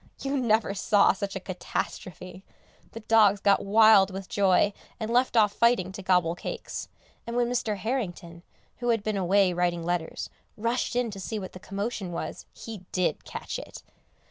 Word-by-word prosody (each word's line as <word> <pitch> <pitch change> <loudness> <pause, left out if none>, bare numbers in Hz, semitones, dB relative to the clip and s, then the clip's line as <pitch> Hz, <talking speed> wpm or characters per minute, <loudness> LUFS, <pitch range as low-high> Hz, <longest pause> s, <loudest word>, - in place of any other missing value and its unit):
You 275 +1 -1
never 225 -6 +2
saw 205 +1 +4
such 195 +1 -5
a - - -2
catastrophe! 185 0 -5 0.5
The 225 - -7
dogs 210 -2 +4
got 200 0 +4
quite - - -8
wild 215 -2 +6
with 195 0 -7
joy, 200 0 +3 0.3
and 220 0 -3
left 245 0 +2
off 210 -2 +5
fighting 235 -6 +2
to 195 - -8
gobble 180 -3 +2
cakes, 175 - -6 0.4
and 235 - -4
when 240 -1 +2
Mr. 235 -4 -1
Harrington, 180 -6 -4 0.4
who 240 0 -2
had 225 -3 +2
been 215 -1 -1
away 190 0 +3
writing 175 -1 0
letters, 175 -1 -3 0.3
rushed 235 +3 -1
in 245 -2 0
to 195 - -8
see 220 +3 -4
what 190 -3 -7
the 185 - -9
commotion 200 -1 -4
was, 170 - -6
he 225 -3 -8
did 180 -4 -1
catch - - -5
it! - - -10
200 Hz, 175 wpm, -27 LUFS, 185-225 Hz, 0.5 s, wild